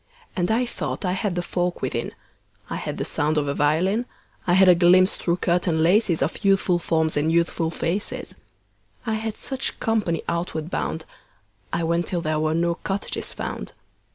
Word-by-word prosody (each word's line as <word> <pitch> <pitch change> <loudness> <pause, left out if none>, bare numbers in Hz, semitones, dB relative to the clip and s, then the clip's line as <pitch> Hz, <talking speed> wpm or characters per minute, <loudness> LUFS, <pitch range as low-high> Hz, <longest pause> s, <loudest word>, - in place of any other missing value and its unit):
And 175 0 0
I 235 +3 +2
thought 235 - -4
I 180 - +1
had 190 0 -1
the 175 - -1
folk 175 0 -2
within: - - -2 0.6
I - - -1
had - - -4
the - - -2
sound 150 +1 0
of 145 -1 +1
a 140 - 0
violin; 180 - +1 0.4
I 175 - +4
had 190 +1 +6
a 180 - +9
glimpse 180 +2 +5
through 170 0 0
curtain 170 -2 +1
laces 180 -1 +3
Of 170 - -3
youthful 195 -3 +3
forms 160 -2 +1
and 150 +2 +2
youthful 170 0 +1
faces. 175 +5 -2 0.7
I 225 - 0
had 220 0 -3
such 265 -1 -3
company 215 -7 0
outward 170 -1 -2
bound. 160 0 -2 0.7
I 170 - -1
went 170 +1 +1
till 175 -2 -1
there 155 -1 0
were 155 0 +1
no 170 +1 +2
cottages 195 +3 -4
found. - - -5
175 Hz, 180 wpm, -24 LUFS, 160-195 Hz, 0.7 s, a